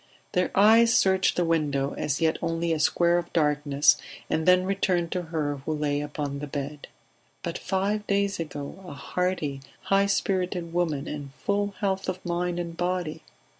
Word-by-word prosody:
Their 180 Hz, 0 st, +1 dB
eyes 225 Hz, +3 st, +6 dB
searched 190 Hz, -3 st, +3 dB
the 175 Hz, -, +1 dB
window, 145 Hz, -4 st, 0 dB
as 145 Hz, -1 st, -2 dB
yet 160 Hz, -1 st, +1 dB
only 165 Hz, 0 st, 0 dB
a 160 Hz, -, -1 dB
square 170 Hz, +2 st, +3 dB
of 175 Hz, -, -7 dB
darkness, 150 Hz, -2 st, +3 dB, 0.3 s
and 160 Hz, +1 st, 0 dB
then 180 Hz, 0 st, +5 dB
returned 185 Hz, -3 st, 0 dB
to 180 Hz, -, -1 dB
her 155 Hz, -4 st, -2 dB
who 140 Hz, +3 st, -4 dB
lay 145 Hz, -1 st, 0 dB
upon 145 Hz, -1 st, -4 dB
the 150 Hz, -, -5 dB
bed... 145 Hz, +1 st, -5 dB, 0.6 s
But -, -, -3 dB
five 205 Hz, +2 st, -1 dB
days 200 Hz, -1 st, +1 dB
ago 150 Hz, +3 st, -6 dB
a 145 Hz, -, -7 dB
hearty, 150 Hz, -1 st, -2 dB, 0.2 s
high 195 Hz, 0 st, +3 dB
spirited 180 Hz, -3 st, -1 dB
woman, 160 Hz, -5 st, 0 dB
in 145 Hz, -2 st, -6 dB
full 200 Hz, 0 st, -1 dB
health 190 Hz, -2 st, 0 dB
of 185 Hz, 0 st, -5 dB
mind 175 Hz, 0 st, -1 dB
and 170 Hz, -1 st, -4 dB
body 175 Hz, -3 st, -2 dB
170 Hz, 170 wpm, -26 LUFS, 150-185 Hz, 0.6 s, eyes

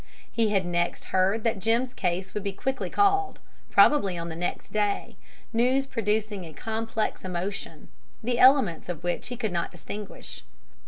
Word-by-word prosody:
He 225 Hz, -2 st, +2 dB
had 195 Hz, -3 st, +2 dB
next 175 Hz, 0 st, -1 dB
heard 195 Hz, +4 st, +3 dB
that 230 Hz, -3 st, +1 dB
Jim's 235 Hz, +5 st, +1 dB
case 185 Hz, 0 st, -2 dB
would 210 Hz, -, -2 dB
be 200 Hz, 0 st, -3 dB
quickly 265 Hz, +6 st, -2 dB
called, 400 Hz, -1 st, +2 dB, 0.3 s
probably 200 Hz, -12 st, +5 dB
on 170 Hz, 0 st, -4 dB
the 160 Hz, -, -5 dB
next 175 Hz, +2 st, -4 dB
day, 205 Hz, -1 st, 0 dB, 0.4 s
news 255 Hz, +4 st, +3 dB
producing 215 Hz, -5 st, -1 dB
a 160 Hz, -2 st, -9 dB
complex 225 Hz, +3 st, -2 dB
emotion, 185 Hz, +2 st, -4 dB, 0.4 s
the 240 Hz, +1 st, 0 dB
elements 255 Hz, -, +5 dB
of 170 Hz, -1 st, -4 dB
which 175 Hz, 0 st, -2 dB
he 245 Hz, -, -5 dB
could 220 Hz, -4 st, -1 dB
not 170 Hz, -1 st, -1 dB
distinguish. 210 Hz, -1 st, -7 dB
210 Hz, 160 wpm, -27 LUFS, 180-235 Hz, 0.4 s, probably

